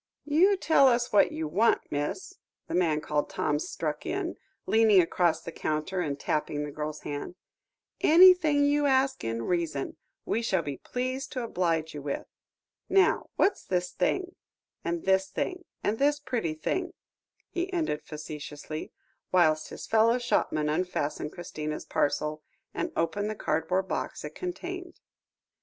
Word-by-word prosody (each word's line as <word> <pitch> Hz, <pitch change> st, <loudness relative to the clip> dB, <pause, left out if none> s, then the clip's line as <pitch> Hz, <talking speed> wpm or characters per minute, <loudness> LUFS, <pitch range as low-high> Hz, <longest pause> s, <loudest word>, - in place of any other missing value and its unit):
"You 350 Hz, +7 st, +4 dB
tell 300 Hz, -6 st, +5 dB
us 240 Hz, -1 st, +2 dB
what 205 Hz, -, +5 dB
you 160 Hz, -1 st, -3 dB
want, 205 Hz, +9 st, +2 dB
miss," 145 Hz, -, -3 dB, 0.3 s
the -, -, -5 dB
man 160 Hz, -4 st, +2 dB
called 150 Hz, -1 st, -1 dB
Tom 150 Hz, -, 0 dB
struck 150 Hz, -1 st, -3 dB
in, 370 Hz, -2 st, -2 dB, 0.3 s
leaning 220 Hz, -3 st, +5 dB
across 175 Hz, -1 st, +2 dB
the 165 Hz, -, -6 dB
counter, 155 Hz, +4 st, -2 dB
and 145 Hz, -4 st, -2 dB
tapping 150 Hz, 0 st, -1 dB
the 150 Hz, -, -5 dB
girl's 150 Hz, +1 st, -5 dB
hand; 145 Hz, +4 st, -5 dB, 0.6 s
"anything 330 Hz, -4 st, +7 dB
you 290 Hz, 0 st, +3 dB
ask 265 Hz, 0 st, +2 dB
in 115 Hz, 0 st, -2 dB
reason 165 Hz, -3 st, -2 dB, 0.3 s
we 230 Hz, -, 0 dB
shall 190 Hz, -7 st, +1 dB
be 145 Hz, -2 st, -4 dB
pleased 255 Hz, +2 st, -3 dB
to 255 Hz, -, -2 dB
oblige 165 Hz, -7 st, -1 dB
you 145 Hz, -, -6 dB
with. 140 Hz, 0 st, -3 dB, 0.6 s
Now, 385 Hz, -1 st, +3 dB
what's 400 Hz, 0 st, +2 dB
this 180 Hz, -1 st, -1 dB
thing, 370 Hz, -, -1 dB, 0.5 s
and 170 Hz, 0 st, -2 dB
this 190 Hz, 0 st, +3 dB
thing, 360 Hz, -, -3 dB, 0.2 s
and 215 Hz, +2 st, 0 dB
this 290 Hz, +1 st, +3 dB
very 290 Hz, -, -21 dB
pretty 225 Hz, -11 st, -1 dB
thing?" 355 Hz, -, -2 dB, 0.6 s
he 360 Hz, +1 st, -2 dB
ended 315 Hz, -, -1 dB
facetiously, 150 Hz, 0 st, -7 dB, 0.4 s
whilst 155 Hz, -4 st, +3 dB
his -, -, -8 dB
fellow 225 Hz, +2 st, +4 dB
shopman 235 Hz, -10 st, 0 dB
unfastened 150 Hz, -2 st, -1 dB
Christina's 155 Hz, -3 st, -5 dB
parcel, 150 Hz, +1 st, 0 dB, 0.3 s
and -, -, -2 dB
opened 205 Hz, +5 st, 0 dB
the 215 Hz, -, -3 dB
cardboard 185 Hz, +2 st, 0 dB
box -, -, -3 dB
it -, -, -7 dB
contained. 360 Hz, 0 st, -6 dB
185 Hz, 150 wpm, -28 LUFS, -, 0.6 s, anything